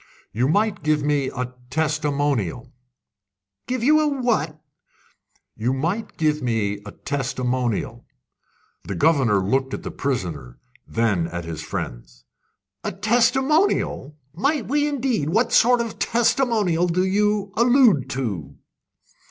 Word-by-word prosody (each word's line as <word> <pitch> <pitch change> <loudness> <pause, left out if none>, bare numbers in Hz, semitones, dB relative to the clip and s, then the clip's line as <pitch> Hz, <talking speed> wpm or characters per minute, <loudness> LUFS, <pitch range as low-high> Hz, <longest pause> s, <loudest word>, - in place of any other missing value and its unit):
"You 120 +4 +1
might 205 +6 +1
give 150 -1 +1
me 145 -2 +1
a 125 -1 -5 0.2
testimonial." 145 - -1 0.9
"Give 250 -2 -2
you 305 +3 +4
what?" 245 - -1 1.0
"You 120 +4 -1
might 170 +11 -3
give 155 -1 +1
me 110 -5 -1
a - - -7
testimonial." 125 -4 -2 0.8
The - - -5
governor 135 -10 +3
looked 130 +5 0
at - - -9
the - - -5
prisoner, 90 - -4 0.3
then 105 -8 0
at 85 0 -6
his 80 -2 -5
friends. - - -7 0.6
"A - - -2
testimonial! 235 - +1 0.2
Might 245 - 0
we 290 +2 +1
indeed! 255 - -1
What 225 +7 +1
sort 245 +1 +5
of 230 -2 -5
testimonial 220 -8 +2
do 180 +2 +1
you 205 0 +1
allude 235 - +4
to?" 95 - -4
150 Hz, 120 wpm, -22 LUFS, -, 1.0 s, sort